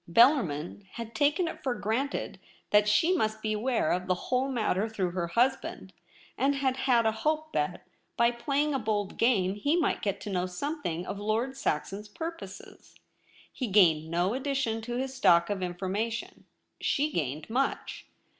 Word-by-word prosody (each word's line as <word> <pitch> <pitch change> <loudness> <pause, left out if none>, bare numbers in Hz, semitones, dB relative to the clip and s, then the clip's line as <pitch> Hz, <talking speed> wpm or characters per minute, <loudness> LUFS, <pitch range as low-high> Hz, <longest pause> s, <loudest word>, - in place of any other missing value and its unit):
Bellarmin 195 - +3
had 230 -1 -7
taken 300 +4 +2
it - - -6
for 255 -3 -1
granted 240 +7 -2 0.3
that 210 0 +5
she 325 - +4
must 215 -8 0
be 215 0 0
aware 230 -4 +1
of 180 +1 -1
the 185 - +2
w^hole 255 +7 -1
matter 220 -3 0
through 190 -5 -1
her 175 -1 -2
husband, 235 -2 0 0.5
and 275 +3 +3
had 270 -2 +1
had 250 -3 +2
a 220 - +4
hope 310 +8 -1
that, - - -1 0.3
by 235 0 +4
playing 280 +5 0
a 270 - 0
bold 210 -3 -2
game, 200 -6 +3
he 285 +11 +1
might 335 - +1
get 200 -2 -1
to 205 - -5
know 180 -1 0
something 180 - -3
of 200 - -5
Lord 225 +6 -1
Saxon's 200 - -2
pur 325 +10 -4
poses. - - -12 0.6
He 255 - -3
gained 165 -6 +4
no 175 +5 +1
addition 265 -4 -1
to 240 +2 -4
his 265 +1 -2
stock 170 -8 +4
of 200 -2 -2
Information. 195 +6 -3 0.4
She 295 +2 +1
gained 150 - -2
much. 260 +5 -2
225 Hz, 170 wpm, -29 LUFS, 190-265 Hz, 0.6 s, that